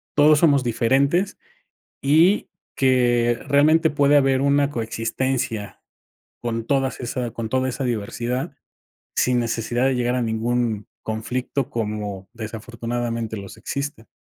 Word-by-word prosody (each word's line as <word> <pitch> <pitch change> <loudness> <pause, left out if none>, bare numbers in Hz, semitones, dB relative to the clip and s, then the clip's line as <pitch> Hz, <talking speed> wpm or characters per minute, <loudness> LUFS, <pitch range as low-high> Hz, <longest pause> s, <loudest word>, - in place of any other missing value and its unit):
todos 150 +1 +6
somos 145 -5 +4
diferentes 140 - +1 0.6
y 160 +8 +4 0.3
que 120 -2 +3
realmente 155 +3 +4
puede 145 -1 +3
haber 135 -2 +3
una 140 0 +3
coexistencia 115 -1 -2 0.6
con 115 -1 -3
todas 135 0 0
esa 120 0 -3
con 115 -1 -5
toda 130 +2 +1
esa 130 +2 -4
diversidad 120 +2 -2 0.6
sin 125 -1 +2
necesidad 120 +1 -1
de 135 -1 +2
llegar 125 0 0
a 125 - 0
ningún 115 -1 -1 0.2
conflicto 125 +4 -3
como 105 -5 -4
desafortunadamente 115 0 -4
los 100 -1 -9
existe. 140 -5 -5
120 Hz, 120 wpm, -22 LUFS, 115-140 Hz, 0.6 s, todos